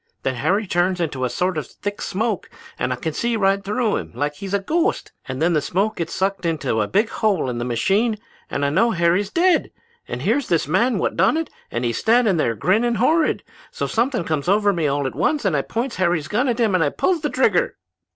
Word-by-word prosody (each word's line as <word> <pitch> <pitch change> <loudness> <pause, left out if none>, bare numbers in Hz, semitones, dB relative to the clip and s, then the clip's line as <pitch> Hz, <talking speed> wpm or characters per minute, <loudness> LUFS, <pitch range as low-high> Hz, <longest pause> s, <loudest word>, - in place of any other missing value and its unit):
Then 130 - 0
Harry 195 - 0
turns 180 0 +1
into 145 -6 -1
a - - -1
sort 180 +6 -1
of 145 - -7
thick 205 0 -6
smoke 210 0 -2 0.3
and - - -1
I - - 0
can 160 +5 -4
see 235 +6 0
right 195 -1 +2
through 215 +2 0
him - - -6
like 145 +4 -1
he 195 +7 -8
was 195 - -1
a - - +2
ghost; 335 - -1 0.2
and 130 0 -4
then 170 +3 +2
the 155 - +2
smoke 200 +8 -1
gets 170 -1 -3
sucked 195 +1 -1
into 145 -9 0
a 105 - 0
big 210 +3 +1
hole 200 - 0
in 120 - -4
the 120 - -2
machine 195 - +1 0.3
and 140 - -1
I 140 - +1
know 210 +10 +3
Harry's 180 +1 +1
dead. 345 - +2 0.4
And - - -5
here's 285 -4 +1
this 165 -5 +1
man 235 - +2
what - - -1
done 190 - +3
it, 325 -1 -3 0.2
just 120 - -2
a 120 - +1
standin' 220 - +3
there, 115 -7 +1
grinnin' 225 - +2
horrid. 310 +9 +2 0.3
So - - -3
something 235 -2 0
comes 155 0 -2
over 205 0 +3
me 165 -4 0
all 140 0 0
at 130 - -2
once 250 - 0
and 185 -6 +2
I 140 - +2
points 235 - -3
Harry's 175 -4 +1
gun 245 +6 0
at 240 0 -1
him 220 -4 +2
and 165 -6 +1
pulls 355 -4 +1
the - - -1
trigger!' - - +1
190 Hz, 235 wpm, -21 LUFS, 155-225 Hz, 0.4 s, know